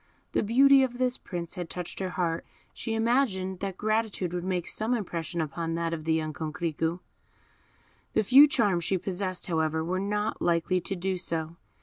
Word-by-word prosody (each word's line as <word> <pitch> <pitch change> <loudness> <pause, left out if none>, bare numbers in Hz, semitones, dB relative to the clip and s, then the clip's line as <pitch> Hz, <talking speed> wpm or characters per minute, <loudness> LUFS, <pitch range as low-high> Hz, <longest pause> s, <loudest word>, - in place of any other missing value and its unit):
The - - +1
beauty 270 +5 +6
of 250 -2 0
this 255 0 0
Prince 170 -2 -5
had 175 -2 -5
touched 180 -1 -5
her 190 -1 -2
heart, 170 -2 -1 0.3
she 225 - -3
imagined 225 -6 +1
that 195 -2 -4
gratitude 215 -4 -1
would 175 -1 -2
make 180 -2 -2
some 225 +3 +1
impression 170 -5 -3
upon 165 +2 -3
that 165 0 -1
of 155 -2 -5
the 160 - +2
young 155 -1 -2
Coquerico. 160 +2 -2 1.1
The - - +3
few 270 +8 +8
charms 205 - +1
she 190 - +1
possessed, 185 0 -3
however, 160 -2 0
were 185 +2 -1
not 210 +2 -2
likely 175 +2 +1
to 195 - -4
do 185 0 -2
so. 165 -2 -2
185 Hz, 180 wpm, -28 LUFS, 165-210 Hz, 1.1 s, few